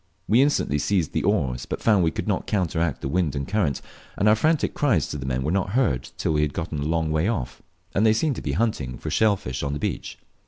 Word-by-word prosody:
We 115 +5 +5
instantly 135 - +1
seized 90 -2 0
the - - +1
oars, 60 -2 0
but - - -3
found 105 -5 +3
we 80 - +3
could - - -5
not - - -1
counteract 85 -6 0
the - - -3
wind 80 -1 0
and 70 -1 -3
current, 95 -10 0 0.3
and 100 - +2
our 105 - +6
frantic 155 +7 +1
cries 110 - +2
to - - -4
the 65 - -5
men 65 0 -1
were 75 - -1
not 95 +1 0
heard 65 - +1
till - - 0
we 75 - +2
had 75 -1 0
got 85 0 -3
a - - -3
long 80 +2 0
way 80 +4 +1
off; 65 - -3 0.3
as 100 - +1
they 110 -1 +5
seemed 140 +4 0
to - - -4
be 70 - -2
hunting 75 - -1
for - - -5
shell 110 -2 +3
fish 65 -7 -5
on 70 0 -2
the 75 - -3
beach. - - -4
80 Hz, 260 wpm, -24 LUFS, 70-105 Hz, 0.3 s, our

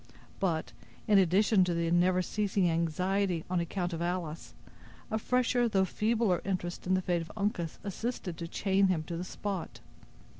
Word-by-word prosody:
But, 160 -8 -1 0.4
in 205 -2 +6
addition 190 +2 +4
to 175 -1 0
the 170 0 0
never 180 +1 +3
ceasing 200 -1 0
anxiety 175 +2 0
on 180 - +2
account 175 +1 -2
of 165 - -4
Alice, 170 -2 -3 0.6
a 220 - 0
fresher 245 0 +2
though 190 -3 +3
feebler 215 -2 +1
interest 180 -2 -3
in 185 - +3
the 185 - 0
fate 175 -2 0
of 165 - -8
Uncas 200 -6 -1
assisted 205 -3 -4
to 170 - -5
chain 195 +2 +2
him 175 -4 +1
to 170 +2 -5
the 170 - -3
spot. 190 -1 -5
185 Hz, 165 wpm, -31 LUFS, 170-200 Hz, 0.6 s, in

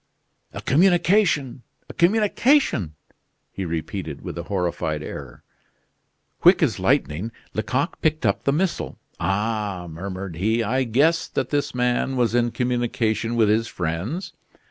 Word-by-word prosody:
"A - - -8
communication! 170 - +3 0.3
a - - -9
communication!" 210 - +2 0.6
he 95 - -4
repeated, 80 -2 -4
with - - -6
a 85 - -4
horrified 85 -5 -1
air. - - -8 1.0
Quick - - +6
as - - +1
lightning, 90 +10 +1 0.2
Lecoq 130 +8 -2
picked 155 -4 +1
up 100 - +1
the 140 - +3
missile. 170 +5 -1 0.2
"Ah," 105 -2 -1
murmured 90 +1 -6
he, 110 +5 +1
"I 130 +5 0
guessed 150 +8 +2
that - - -1
this 145 -3 -1
man 125 +2 +1
was 120 -2 +1
in 120 0 +2
communication 120 -2 -1
with 115 -2 +4
his 110 +2 +2
friends." 110 - -3
120 Hz, 130 wpm, -23 LUFS, 95-145 Hz, 1.0 s, Quick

